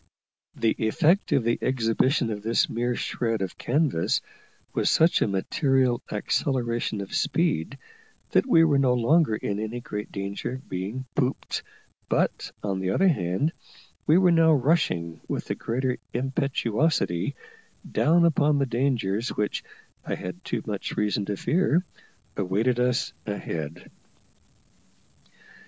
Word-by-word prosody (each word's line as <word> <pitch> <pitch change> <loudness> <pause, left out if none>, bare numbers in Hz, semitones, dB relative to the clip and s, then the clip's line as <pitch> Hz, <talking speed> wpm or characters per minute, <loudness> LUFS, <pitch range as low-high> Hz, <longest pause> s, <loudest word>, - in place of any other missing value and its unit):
The 115 - +2
effect 165 - +2
of 135 - +3
the 115 +1 +1
exhibition 125 0 +1
of 105 -1 -4
this 115 +2 +2
mere 120 +1 -1
shred 115 -4 -1
of 95 - -6
canvas 140 - +1 0.5
was - - +1
such 165 +2 +4
a - - +3
material 125 +5 +1
acceleration 120 -1 -1
of 100 - -8
speed 140 - 0 0.5
that - - +3
we 165 -10 +6
were 145 -4 +4
no 130 -2 +3
longer 125 +1 +3
in 105 -1 -3
any 110 +3 -3
great 105 -3 -6
danger 100 +4 -4
of 130 +1 -9
being 100 +8 -4
"pooped;" 135 -2 -1 0.5
but, - - 0
on 100 -2 -1
the 95 -1 -1
other 190 - +3
hand, 100 - 0 0.5
we 155 - +6
were 180 -1 +5
now 165 -1 +5
rushing 125 - +1
with - - -3
the - - -2
greater 125 +2 -2
impetuosity 135 - 0 0.6
down 170 +3 +4
upon 150 -2 +3
the 140 - +2
dangers 120 -4 0
which, 105 0 -2 0.4
I - - -2
had 90 0 -7
too - - -3
much - - -4
reason 105 -1 0
to 100 0 -3
fear, 175 - +2 0.5
awaited 105 +6 0
us 125 +4 +1
ahead. 85 -5 -5
120 Hz, 135 wpm, -26 LUFS, 105-145 Hz, 0.6 s, we